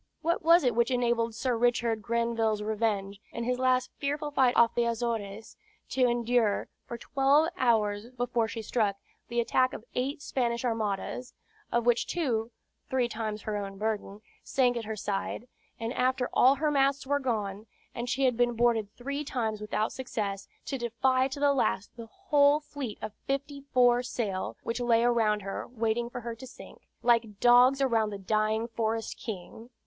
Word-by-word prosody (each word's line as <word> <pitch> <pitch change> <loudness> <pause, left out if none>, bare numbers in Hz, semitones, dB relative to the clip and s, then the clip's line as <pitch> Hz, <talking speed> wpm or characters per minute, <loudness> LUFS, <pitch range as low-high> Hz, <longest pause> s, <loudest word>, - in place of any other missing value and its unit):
What 335 +2 +1
was 335 0 +6
it 250 -2 +2
which 235 +2 +2
enabled 235 -2 +1
Sir 250 +1 0
Richard 235 -1 +1
Grenvil's 225 -1 0
Revenge, 210 -2 -1
in 235 - -4
his 250 +1 -1
last 255 0 +2
fearful 295 +1 -2
fight 260 -3 +3
off 235 -1 +5
the 240 - +1
Azores, 225 -3 -3 0.3
to 255 -1 +3
endure, 235 -3 +1 0.2
for 235 - -5
twelve 280 +6 +3
hours 220 - +1
before 245 -2 -1
she 225 0 -6
struck, 210 -3 0 0.3
the 235 0 -1
attack 255 +2 +2
of 215 - -8
eight 275 +4 -2
Spanish 235 -1 -1
armadas, 225 +2 -2 0.4
of 235 0 +1
which 240 -1 +2
two 235 -10 -1 0.4
(three 255 -2 +1
times 215 -2 -4
her 215 - -3
own 195 -1 -4
burden) 210 -1 -3 0.2
sank 250 -2 +1
at 235 -2 -3
her 220 0 -4
side; 205 +3 -3 0.3
and 225 +1 -3
after 255 0 +1
all 260 +2 +6
her 300 +2 0
masts 275 -1 +2
were 285 +1 +1
gone, 215 -5 -3 0.3
and 240 +1 -4
she 270 +2 +1
had 250 -2 +3
been 240 +1 +2
boarded 225 -3 +2
three 280 +4 -4
times 220 -6 -2
without 210 +1 -1
success, 205 -6 -4 0.2
to 270 - -3
defy 255 +3 +1
to 275 +1 -7
the 285 0 +4
last 205 -7 -1
the 230 -2 -9
whole 295 - +3
fleet 285 -7 -6
of 215 -1 -4
fifty 280 +1 -3
four 245 -1 +5
sail, 210 -6 -3
which 230 +2 -3
lay 235 -1 +3
around, 225 -3 +2
her, 195 0 -5
waiting 235 0 -1
for 245 - -6
her 235 0 -5
to 240 +3 -10
sink, - - -14 0.2
"like 230 -4 +2
dogs 245 +3 +6
around 225 -5 +2
the 205 - -5
dying 215 +3 0
forest 225 -1 -2
king?" 220 +2 -7
235 Hz, 175 wpm, -29 LUFS, 220-255 Hz, 0.4 s, was